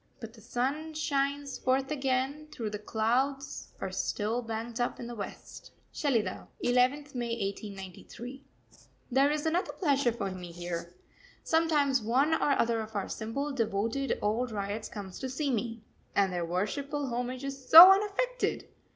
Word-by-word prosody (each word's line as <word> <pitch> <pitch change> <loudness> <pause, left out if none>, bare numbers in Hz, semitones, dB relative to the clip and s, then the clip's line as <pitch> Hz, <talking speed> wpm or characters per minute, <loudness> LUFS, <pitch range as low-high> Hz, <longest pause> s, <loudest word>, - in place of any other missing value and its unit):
But 225 -3 -8
the 225 - -15
sun 280 +8 -2
shines 280 -2 -1
forth 265 +2 +1
again, 270 +1 -1
though 225 -3 -2
the 210 0 -5
clouds 250 +6 -1
are - - -4
still 220 +3 -1
banked 225 +1 -5
up 240 - -1
in 240 - -5
the 240 - -6
West. 205 -4 -8 0.2
SHELIDAH, 230 - -1 0.2
11th 255 +4 +2
May 240 -2 -2 0.2
1893. 205 +7 -9 0.7
There 270 +3 +4
is 300 +1 -1
another 340 +4 0
pleasure 280 -7 +2
for 210 -4 -3
me 180 -2 -7
here. 175 0 -6 0.5
Sometimes 300 -5 +2
one 260 +8 +2
or 295 -3 +2
other 230 -1 +2
of 220 0 -9
our 200 - -2
simple, 275 +7 -3
devoted, 230 +2 -1
old 230 +4 0
ryots 205 +1 -4
comes 195 -4 -8
to 260 - -4
see 275 +2 -1
me 230 -1 -3 0.3
and 195 -2 +3
their 175 -1 -1
worshipful 280 - -2
homage 250 +2 -3
is 275 -1 -6
so 345 +4 +13
unaffected! 420 +6 0
250 Hz, 150 wpm, -30 LUFS, 220-280 Hz, 0.7 s, so